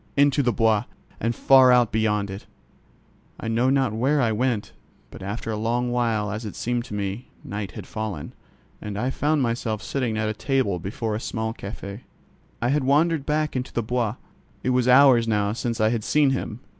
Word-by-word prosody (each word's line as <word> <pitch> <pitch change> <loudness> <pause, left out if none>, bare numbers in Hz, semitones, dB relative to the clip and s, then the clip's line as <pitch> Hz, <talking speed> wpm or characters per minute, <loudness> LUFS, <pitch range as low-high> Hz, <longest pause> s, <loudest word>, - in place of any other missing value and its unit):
Into 140 0 +4
the 125 -3 +2
Bois, 110 -3 +2 0.3
and 115 +1 -1
far 130 -1 +6
out 125 -2 +4
beyond 105 -2 0 1.1
it—I - - -5
know 115 +3 +2
not 135 -4 +2
where 135 +7 +1
I 120 -4 +2
went, 115 -1 -1 0.4
but - - -11
after 105 +4 -4
a - - -2
long 120 +3 0
while 115 -4 0
as 105 +3 -4
it 105 - -6
seemed 120 0 -2
to 105 - -7
me, 100 +4 -4 0.2
night 100 -4 -5
had - - -8
fallen, 110 -9 -5 0.5
and 105 -1 -5
I 125 +5 -1
found 145 +1 +1
myself 115 -2 -2
sitting 125 -5 -2
at 110 0 0
a 110 - -1
table 120 -6 0
before 110 +4 -3
a 105 - -2
small 110 -1 -3
cafķ. 100 -1 -7 0.6
I 120 - +2
had 145 +1 +1
wandered 150 +2 +2
back 155 -1 0
into 125 0 -3
the 120 - -1
Bois. 115 -2 -1 0.5
It 130 - +1
was 125 -1 +2
hours 125 -2 +6
now 105 -2 +1
since 120 0 -3
I 110 0 +3
had 115 -2 -1
seen 145 +2 +3
him. 125 -3 -4
115 Hz, 195 wpm, -24 LUFS, 105-130 Hz, 1.1 s, far